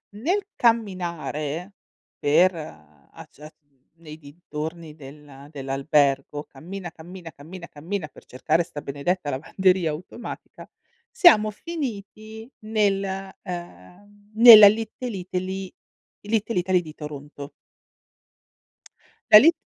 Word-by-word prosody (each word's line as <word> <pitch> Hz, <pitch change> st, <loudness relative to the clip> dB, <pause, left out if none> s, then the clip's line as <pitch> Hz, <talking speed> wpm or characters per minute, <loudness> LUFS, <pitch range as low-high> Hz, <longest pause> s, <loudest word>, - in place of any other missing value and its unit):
Nel 350 Hz, -, -1 dB
camminare, 180 Hz, -6 st, -1 dB, 0.5 s
per, 165 Hz, +6 st, +4 dB
uhm, 75 Hz, -, -12 dB
a -, -, -12 dB
giar 150 Hz, +2 st, -13 dB, 0.4 s
nei 155 Hz, -2 st, -12 dB
dintorni 155 Hz, +1 st, -8 dB
del 140 Hz, -1 st, -13 dB
dell'albergo, 140 Hz, 0 st, 0 dB
cammina, 175 Hz, +5 st, -9 dB
cammina, 170 Hz, +1 st, -11 dB
cammina, 175 Hz, +5 st, -11 dB
cammina, 165 Hz, +3 st, -5 dB
per -, -, -18 dB
cercare 155 Hz, +6 st, 0 dB
sta 150 Hz, -3 st, -7 dB
benedetta 145 Hz, +3 st, -3 dB
lavanderia 180 Hz, +5 st, +1 dB
automatica, 175 Hz, +10 st, -9 dB, 0.4 s
siamo 345 Hz, -, +5 dB
finiti 220 Hz, -5 st, -7 dB
nel 210 Hz, -3 st, 0 dB, 0.4 s
uhm, 205 Hz, +3 st, -11 dB
nella 220 Hz, -2 st, +11 dB
Little 225 Hz, +1 st, -2 dB
Italy 185 Hz, +1 st, -5 dB, 0.5 s
Little 215 Hz, -1 st, -1 dB
Italy 180 Hz, 0 st, +1 dB
di 155 Hz, -3 st, -11 dB
Toronto. 145 Hz, -1 st, -9 dB, 1.8 s
La 210 Hz, -, +12 dB
Lit 320 Hz, +8 st, +6 dB
175 Hz, 100 wpm, -24 LUFS, 150-205 Hz, 1.8 s, La